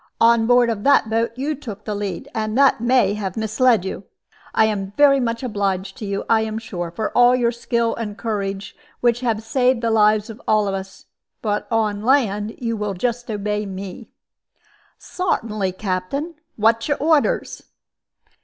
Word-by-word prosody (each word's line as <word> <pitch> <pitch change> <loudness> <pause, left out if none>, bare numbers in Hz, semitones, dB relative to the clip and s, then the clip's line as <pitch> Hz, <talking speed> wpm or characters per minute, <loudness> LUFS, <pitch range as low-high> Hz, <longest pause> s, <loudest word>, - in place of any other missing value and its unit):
On 230 -1 +4
board 245 -1 +4
of 205 -2 -4
that 280 -6 +4
boat 230 +1 +1
you 280 +4 -2
took 220 -8 -9
the 215 - -2
lead, 200 -3 -4
and 215 +1 -2
that 275 -4 +4
may 240 -5 +3
have 200 -3 -4
misled 220 -1 +2
you. 190 - -5 0.5
I 220 - +4
am 200 -2 -2
very 280 -1 +6
much 230 -1 -2
obliged 195 -4 -2
to 210 - -6
you, 200 0 -2
I 225 -1 +3
am 220 0 -3
sure, 180 -6 -5
for 210 +6 -3
all 245 +1 +6
your 240 -2 +1
skill 235 -1 -1
and 215 -3 -5
courage, 200 -2 -4 0.3
which 240 -1 +2
have 230 -3 -1
saved 250 +1 +1
the 230 -1 0
lives 215 -1 +3
of 220 - -13
all 215 -1 +3
of 195 - -1
us. 195 0 -7 0.4
But 210 -2 -1
on 215 -3 0
land 220 -4 +1
you 230 -2 -2
will 210 -2 -3
just 240 +5 -2
obey 210 0 -2
me." 195 +3 -8 0.9
"Sartinly, 215 - -2
Captain. 190 - -3 0.2
What's 230 +1 +2
your 290 - 0
orders?" 305 0 +1
220 Hz, 175 wpm, -21 LUFS, 205-240 Hz, 0.9 s, very